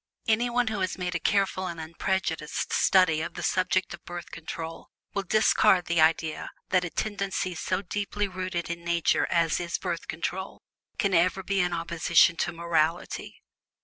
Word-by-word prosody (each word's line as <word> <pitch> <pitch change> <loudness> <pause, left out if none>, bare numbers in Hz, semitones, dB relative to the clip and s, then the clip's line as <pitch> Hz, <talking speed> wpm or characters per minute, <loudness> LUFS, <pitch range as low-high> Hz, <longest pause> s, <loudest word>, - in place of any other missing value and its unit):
Any 230 +2 +2
one 240 -1 +1
who 215 -2 -3
has 185 -1 -1
made 180 -1 -3
a 170 - -1
careful 195 -1 +1
and 170 -2 -6
unprejudiced 160 -1 -2
study 180 -5 +4
of 170 - -5
the - - -5
subject 185 0 +1
of 175 - -10
Birth 175 0 -8
Control 165 0 -7 0.2
will 200 - 0
discard 195 -2 +4
the 170 -1 +2
idea 160 0 +2 0.2
that 185 -1 +3
a 180 - -3
tendency 195 -2 -2
so 185 +3 -2
deeply 205 +2 -2
rooted 185 -2 -3
in 170 0 -6
Nature 170 -1 +2
as 165 -2 +2
is 175 -1 -2
Birth 175 -3 -4
Control 185 +4 -4 0.3
can 200 -2 +1
ever 180 +2 +3
be 195 +1 0
in 180 -1 +2
opposition 170 0 +3
to - - 0
morality. 165 0 -1
180 Hz, 170 wpm, -27 LUFS, 170-190 Hz, 0.3 s, study